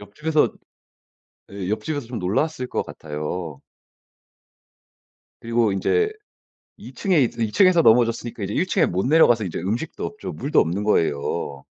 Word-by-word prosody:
옆집에서 150 +10 0 1.0
예 95 -2 -5
옆집에서 115 +5 -3
좀 120 -1 -5
놀랐을 125 - -1
것 - - -1
같아요. 75 0 -6 1.8
그리고 115 -2 +1
인제 430 - +1 0.6
2 - - -12
층에 185 -8 +2
이제 115 -1 0
2 105 - -2
층에서 185 - +5
넘어졌으니까 115 -1 +2
이제 - - -3
1 - - +1
층에 - - +2
못 95 +5 -1
내려가서 125 -7 +4
이제 85 -4 -4
음식도 110 - -3
없죠. 215 - -6
물도 140 +4 0
없는 90 +6 -2
거예요. 70 -6 -1
115 Hz, 295 characters per minute, -22 LUFS, 95-150 Hz, 1.8 s, 층에서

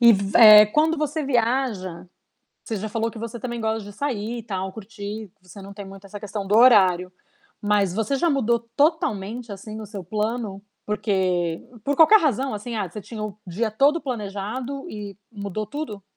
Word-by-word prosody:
e 235 -1 +8
v 195 0 -1
eh, 215 -2 +10
quando 315 +8 +2
você 305 0 -2
viaja 230 -9 -1 0.6
você 220 - -4
já 215 +3 -4
falou 225 +1 -2
que 225 - -10
você 230 +1 -6
também 240 0 -5
gosta 220 -1 -1
de 205 - -10
sair, 235 -2 -3
tal, 190 -3 -4
curtir, 210 0 -8
você 185 +2 -13
não 195 +1 -10
tem 200 0 -8
muito 195 +1 -12
essa 205 +1 -8
questão 205 -1 -5
do 205 - +2
horário, 190 -7 +5 0.5
mas 205 -3 +2
você 225 +7 0
já 335 +5 +1
mudou 235 -5 +2 0.2
totalmente, 235 - 0
assim, 215 +2 -8
o - - -7
seu 200 -3 -8
plano 210 +1 -3 0.2
porque 190 -5 0 0.2
por 285 0 0
qualquer 395 +7 +7
razão, 270 -3 0
assim, 215 +3 -5
ah, 200 -4 -2
você 205 +5 -8
tinha 215 +2 -8
o 210 -1 -6
dia 210 +6 -2
todo 285 +9 +3
planejado 245 - -5
e 205 -2 -8
mudou 205 0 -5
tudo? 280 -8 -6
215 Hz, 180 wpm, -23 LUFS, 200-240 Hz, 0.6 s, eh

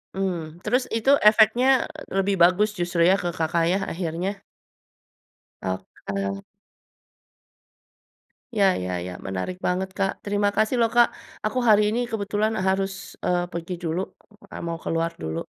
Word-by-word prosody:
Mmm, 175 -3 -3
terus 250 +4 +1
itu 230 +5 +3
efeknya 230 +5 +5 0.2
lebih 195 +1 0
bagus 185 +5 +5
justru 175 -1 +1
ya 190 +3 +5
ke 175 -2 -3
Kakak 165 +1 +1
ya 185 +3 +2
akhirnya? 180 +3 -3 1.2
Oke. 100 +1 -4 2.1
Ya 200 - +4 0.2
ya 90 - -3 0.2
ya 90 - -6
menarik 95 - -3
banget 185 +1 0
Kak 195 -1 +1 0.2
terima 205 0 +1
kasih 215 +4 +2
loh 230 -1 +3
Kak 240 0 +7 0.4
aku 235 +4 0
hari 210 -1 +7
ini 230 +3 0
kebetulan 210 +1 0
harus, 195 0 +1 0.3
eee, 175 0 0
pergi 170 +2 -5
dulu, 165 +1 -1 0.7
mau 165 0 -3
keluar 165 0 -1
dulu. 80 0 -3
185 Hz, 130 wpm, -24 LUFS, 165-210 Hz, 2.1 s, Kak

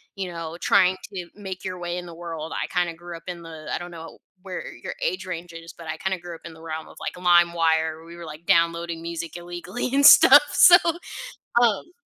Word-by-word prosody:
you 190 -2 -4
know, 165 0 -6
trying 185 -1 +4 0.2
to 180 -2 -6
make 190 -2 -8
your 185 -1 -4
way 175 0 -4
in 175 - -6
the 170 - -10
world, 165 -2 -6
I - - -2
kinda 175 -2 -1
grew 170 0 -9
up 165 - -16
in 175 -1 -6
the 160 -2 -10
I - - 0
don't 175 0 -8
know 165 -1 -11 0.2
where 185 -2 -7
your - - -7
age 370 - -2
range 175 -1 -6
is, 165 0 -10
but 165 -1 -12
I 160 0 -4
kinda 190 +2 -2
grew 175 -1 -8
up - - -15
in 165 - -9
the 160 - -15
realm 160 -1 -6
of - - -15
like - - -4
Limewire, 165 -2 +2
we 170 +1 -12
were 170 -1 -9
like 155 +2 -10
downloading 170 0 +1
music 170 0 -6
illegally 175 +7 -5
and 280 0 +4
stuff, - - +9
so, 350 0 +9 0.8
um 235 - +1
170 Hz, 225 wpm, -24 LUFS, 165-180 Hz, 0.8 s, stuff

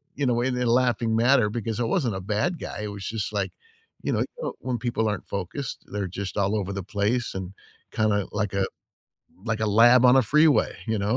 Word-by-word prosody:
you 140 - -1
know, 120 -1 +2
in 130 - +1
a - - -1
way, 125 - -2
they 125 - 0
laughing 120 -2 +2
matter 120 -1 +4
because 115 0 -3
I - - +1
wasn't 120 - 0
a 95 - -4
bad 110 - -1
guy, - - -6
it 105 - -4
was 100 -1 -8
just 110 -1 -3
like, 100 -2 -1 0.5
you - - 0
know, - - +1 0.2
uh, - - -1
um, - - -8
when 125 -1 -2
people 115 -1 -1
aren't 105 -3 -4
focused, 100 +8 -5
they're 100 -1 -2
just 95 +3 -5
all 100 +1 +1
over 100 -1 -3
the 100 - -4
place 105 +5 -1
and 95 0 -6 0.4
kinda 105 -2 +1
like 105 -1 -2
a 100 -1 +1 0.8
like 115 -2 -2
a 110 - +1
lab 120 +4 +6
on 125 +1 +7
a 135 - +6
freeway, 150 +1 +3
you 110 -1 0
know? 105 +5 +1
110 Hz, 235 wpm, -25 LUFS, 100-125 Hz, 0.8 s, on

